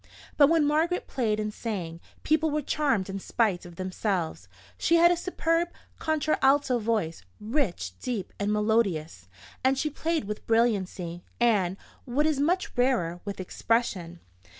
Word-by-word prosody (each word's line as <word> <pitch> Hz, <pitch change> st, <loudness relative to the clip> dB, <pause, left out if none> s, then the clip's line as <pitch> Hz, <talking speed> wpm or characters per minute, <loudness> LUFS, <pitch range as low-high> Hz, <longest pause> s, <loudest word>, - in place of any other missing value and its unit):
But 285 Hz, -2 st, +6 dB
when 325 Hz, -2 st, +4 dB
Margaret 320 Hz, +5 st, +1 dB
played 220 Hz, -5 st, -1 dB
and 210 Hz, 0 st, -2 dB
sang, 180 Hz, -9 st, -4 dB, 0.2 s
people 315 Hz, +1 st, +2 dB
were 300 Hz, 0 st, -1 dB
charmed 270 Hz, -10 st, +1 dB
in 195 Hz, 0 st, -4 dB
spite 195 Hz, -4 st, 0 dB
of 175 Hz, -, -13 dB
themselves. 185 Hz, -, -2 dB, 0.3 s
She 335 Hz, -, +2 dB
had 340 Hz, +1 st, +6 dB
a -, -, +3 dB
superb 340 Hz, -1 st, 0 dB, 0.3 s
contralto 285 Hz, -4 st, +2 dB
voice, 210 Hz, -, -1 dB, 0.2 s
rich, 215 Hz, -, -1 dB
deep, 225 Hz, -7 st, -4 dB
and 205 Hz, +1 st, 0 dB
melodious; 200 Hz, -, 0 dB, 0.4 s
and 265 Hz, +1 st, +3 dB
she 305 Hz, +2 st, -1 dB
played 325 Hz, +1 st, -1 dB
with 210 Hz, +1 st, -6 dB
brilliancy, 190 Hz, -7 st, 0 dB, 0.2 s
and, 200 Hz, -6 st, +2 dB, 0.3 s
what 275 Hz, +4 st, +1 dB
is 310 Hz, -3 st, +1 dB
much 355 Hz, +6 st, 0 dB
rarer, 240 Hz, -10 st, +1 dB
with 200 Hz, -1 st, -5 dB
expression. 185 Hz, -3 st, -1 dB
230 Hz, 145 wpm, -27 LUFS, 190-295 Hz, 0.4 s, But